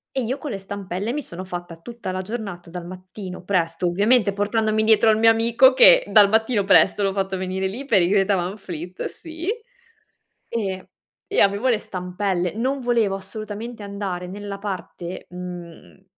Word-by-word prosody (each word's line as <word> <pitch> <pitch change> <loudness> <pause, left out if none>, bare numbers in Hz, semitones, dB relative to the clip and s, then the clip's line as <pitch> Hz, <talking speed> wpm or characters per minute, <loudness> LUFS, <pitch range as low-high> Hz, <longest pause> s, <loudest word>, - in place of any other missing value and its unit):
E 265 - +1
io 255 +5 -2
con 290 -1 -6
le 200 - -3
stampelle, 195 +2 -4
mi 295 - -2
sono 185 -7 -7
fatta 175 -2 -7
tutta 230 +1 -7
la 185 - -3
giornata 195 -4 -6
dal 175 0 -7
mattino 185 0 -9
presto, 175 -2 0
ovviamente, 205 +4 +3
portandomi 215 +1 +1
dietro 220 0 +5
al 215 - +4
mio 225 +1 +6
amico, 235 +3 +5
che - - +8
dal 210 -2 +6
mattino 220 0 +1
presto 205 +1 +5
l'ho 195 -1 +1
fatto 190 -1 -2
venire 190 +1 -2
lì, 240 +9 -6
per 220 -9 +4
i 175 - +2
Greta 195 0 +3
Van 180 +3 -3
Fleet, 180 -2 -7
sì. 325 +1 -7 1.0
E 190 -5 -3 0.4
e - - 0
avevo 200 +5 +3
le 235 -4 +3
stampelle. 180 -1 -2
Non 260 +5 -1
volevo 235 -6 +1
assolutamente 215 +3 -7
andare 200 -3 -5
nella 200 +1 -6
parte, 185 -3 -6
mhmm, 175 - -9
200 Hz, 170 wpm, -22 LUFS, 185-225 Hz, 1.0 s, che